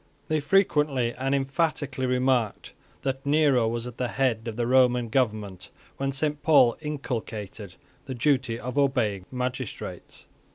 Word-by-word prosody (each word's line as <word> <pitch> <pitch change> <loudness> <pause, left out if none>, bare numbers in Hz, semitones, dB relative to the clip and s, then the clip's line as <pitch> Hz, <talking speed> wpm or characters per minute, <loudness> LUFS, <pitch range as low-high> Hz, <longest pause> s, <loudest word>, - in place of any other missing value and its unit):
They 155 0 +2
frequently 150 -8 +2
and 135 +2 -1
emphatically 135 -1 -1
remarked 125 -3 0 0.3
that 135 0 -2
Nero 140 -5 +3
was 115 +1 -2
at 125 -1 -8
the 125 - -1
head 120 -3 0
of 115 - -4
the 120 0 -1
Roman 125 -1 +3
government 110 -6 -1 0.3
when 135 0 -1
Saint 150 +2 -1
Paul 145 -7 +5
inculcated 110 - -5 0.3
the 130 - -4
duty 130 -3 +1
of 125 +4 -3
obeying 115 -9 +1
magistrates. 125 -2 -5
130 Hz, 135 wpm, -26 LUFS, 115-140 Hz, 0.3 s, Paul